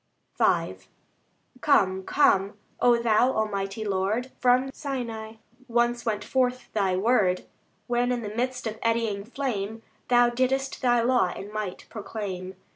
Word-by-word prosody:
V - - +2 0.8
Come, 190 -10 +3
come, 200 -4 +2 0.2
O 240 -1 +5
Thou 235 +2 +3
Almighty 205 0 -2
Lord! 205 +6 -1
From 255 +2 +3
Sinai 230 -6 -5 0.3
once 240 0 +1
went 210 -2 -1
forth 255 0 -1
Thy 195 -3 +1
word, 195 -3 +2 0.4
When 245 +1 +1
in 245 -2 -1
the 210 0 -6
midst 250 +1 -2
of 220 0 -4
eddying 225 -3 0
flame, 225 -3 -4 0.2
Thou 245 -1 +5
didst 265 +2 0
Thy 240 -2 +3
law 245 -7 +3
in 205 +2 -8
might 210 -4 -4
proclaim. 195 -4 -6
230 Hz, 130 wpm, -26 LUFS, 200-245 Hz, 0.8 s, O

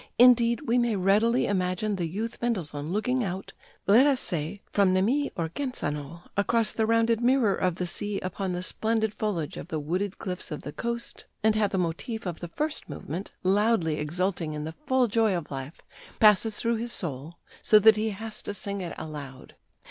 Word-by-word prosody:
Indeed, 235 0 +6
we 250 -4 +1
may 240 -2 +1
readily 210 +6 +3
imagine 190 +2 0
the 175 -3 -2
youth 220 +8 -5
Mendelssohn 165 -10 -2
looking 250 +5 0
out, 190 -1 -5 0.3
let 235 +8 +6
us 275 -3 +3
say, 170 +3 -3
from 195 -2 +3
Nemi 245 +10 +2
or 165 -3 -2
Genzano 170 - -4
across 215 +2 +2
the 220 -1 0
rounded 230 0 +3
mirror 245 -4 +3
of 180 -2 0
the 180 - -2
sea 205 +3 -2
upon 185 +1 -3
the 180 0 -3
splendid 220 +2 0
foliage 190 -10 -2
of - - -7
the 160 -3 -3
wooded 180 +6 -2
cliffs 180 -1 -5
of 150 - -6
the 145 - -6
coast, 235 0 -5 0.2
and 220 0 +4
how 215 -1 +3
the 195 - -3
motive 185 +6 -3
of 175 -3 -4
the 175 - -5
first 295 - -3
movement, 160 +6 -6
loudly 190 -5 +2
exulting 170 +1 -1
in 150 0 -4
the 160 +1 -5
full 260 -2 +3
joy 220 -3 +2
of 160 -4 -7
life, 135 +3 -6 0.4
passes 210 0 +5
through 230 0 0
his 235 +1 -3
soul, 155 - -3 0.3
so 215 - +6
that 220 +1 +7
he 215 +1 0
has 220 +2 -5
to 205 - -4
sing 200 0 -2
it 175 -2 -5
aloud. 140 -4 -8
200 Hz, 190 wpm, -27 LUFS, 170-230 Hz, 0.4 s, that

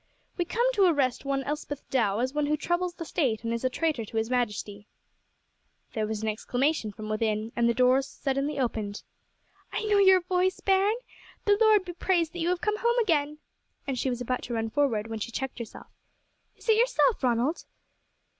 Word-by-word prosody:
"We 350 - -1
come 470 +7 0
to 395 -5 +4
arrest 275 -6 +1
one 275 -1 0
Elspeth 290 0 -5
Dow, 215 -6 +2
as 255 +3 -1
one 295 -1 0
who 300 +1 +1
troubles 345 +3 -1
the 335 - -6
state 250 -10 0
and 230 0 -1
is 235 - -3
a 255 - +2
traitor 305 -3 -1
to 220 +1 -6
his 225 +2 -1
majesty." 210 -4 -2 1.1
There 215 -1 -1
was 220 0 -4
an - - -1
exclamation 245 +3 0
from 215 +1 -8
within 215 0 -1
and 235 -1 +3
the 235 - +1
door 255 +2 +4
suddenly 275 +1 -2
opened. 220 -5 -2 0.7
"I - - -2
know 415 -1 +3
your 380 -2 +6
voice, 365 +1 0
bairn. 390 +2 +3 0.5
The 410 - +5
Lord 430 -3 +5
be 350 - -6
praised 345 -2 0
that 350 - -6
you 335 +1 0
have 360 0 0
come 425 0 +1
back 425 - -6
home 475 +1 +3
again!" 305 -9 +1 0.5
and 265 -3 -2
she 265 - 0
was 245 -1 -3
about 250 +1 -1
to 240 - -4
run 225 0 -2
forward, 250 -7 +1
when 225 -1 -5
she 235 - -4
checked 265 0 -4
herself. 230 -3 -9 0.7
"Is - - -16
it 440 -1 +5
yourself, 485 0 +3
Ronald?" 250 +6 +1
275 Hz, 200 wpm, -27 LUFS, 230-355 Hz, 1.1 s, your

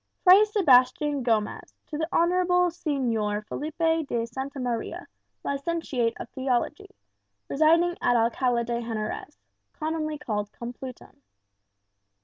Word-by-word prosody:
"Fray 375 +3 +8
Sebastian 290 - +3
Gomez, 225 -4 -1
to 305 - -7
the 320 - 0
Honourable 360 +1 +3
Señor 230 -10 -1
Felipe 325 +3 -1
de 230 -3 -1
Santa 265 +4 -6
Maria, 240 -3 -3 0.4
Licentiate 280 -5 -1
of - - -6
Theology, 265 +10 -2 0.6
residing 335 +4 +3
at 245 - +3
Alcala 235 +1 +2
de 235 0 -2
Henarez, 225 +5 -5 0.4
commonly 310 -1 -3
called 210 -7 -3
Complutum. 245 +1 -9
275 Hz, 110 wpm, -26 LUFS, 235-325 Hz, 0.6 s, Fray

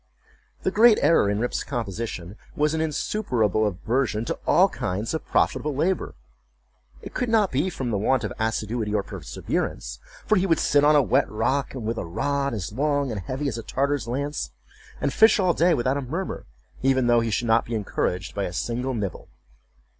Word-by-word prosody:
The - - +1
great 225 +1 +6
error 135 -11 +4
in 100 - 0
Rip's 120 +3 -1
composition 105 -6 -4 0.2
was 150 +1 +1
an 160 - 0
insuperable 125 - 0
aversion 110 +3 -1
to - - -3
all - - +6
kinds 100 - -3
of 160 - -4
profitable 150 -2 +1
labor. 180 +7 -1 0.9
It - - -9
could 250 -2 -1
not 215 -4 +3
be 145 +8 +1
from 130 -8 -4
the 100 - 0
want 130 +3 +2
of 105 - -3
assiduity 110 -1 -1
or 100 - +1
perseverance; - - -4 0.3
for 215 - +3
he 190 +1 +2
would 165 - +3
sit 145 0 +3
on 150 +1 +6
a 145 - +5
wet 135 +2 +2
rock, 130 +6 -1
with 115 -2 -3
a - - -4
rod 140 +8 -1
as 95 -4 -4
long 145 +1 0
and 105 -3 -4
heavy 130 +10 -3
as 115 -4 -3
a - - -4
Tartar's 140 +1 -1
lance, 140 +5 -3 0.5
and - - -1
fish 220 -1 +6
all 185 -3 +3
day 170 +1 +3
without 130 +2 0
a - - -2
murmur, 165 +9 -4 0.3
even 130 -1 +2
though 120 0 +4
he 115 0 -1
should 115 +2 -1
not 115 +1 +3
be 115 - -4
encouraged 95 -3 -2
by 100 -1 -2
a 90 - -5
single 125 +7 -2
nibble. 100 -5 -4
125 Hz, 190 wpm, -24 LUFS, 110-145 Hz, 0.9 s, great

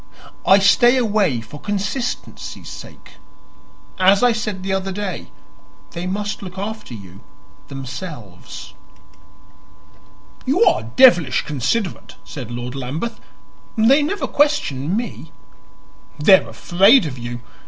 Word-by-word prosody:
I 195 - +8
stay 240 +6 +5
away 205 - +1
for 130 +6 -12
consistency's 205 +5 -4
sake. - - -12 0.8
As 195 +3 +5
I 245 - +5
said 210 -4 -3
the 190 0 -2
other 190 0 -2
day, 195 -1 -5 0.6
they 175 +2 -5
must 205 +2 -3
look 190 -1 -9
after 205 - -6
you 95 -2 -12 0.5
themselves." 125 - -8 1.7
"You 315 - +2
are - - +3
devilish 175 - +4
considerate," 150 - -2
said 130 -6 -8
Lord 120 +1 -5
Lambeth. 140 - -4 0.6
"They 250 +7 +5
never 355 +8 -1
question 200 - +1
me." 220 -9 -6 0.9
"They 190 +6 +7
are - - -12
afraid 195 +6 +4
of 130 -4 -6
you. 120 +1 -6
190 Hz, 115 wpm, -20 LUFS, 135-220 Hz, 1.7 s, I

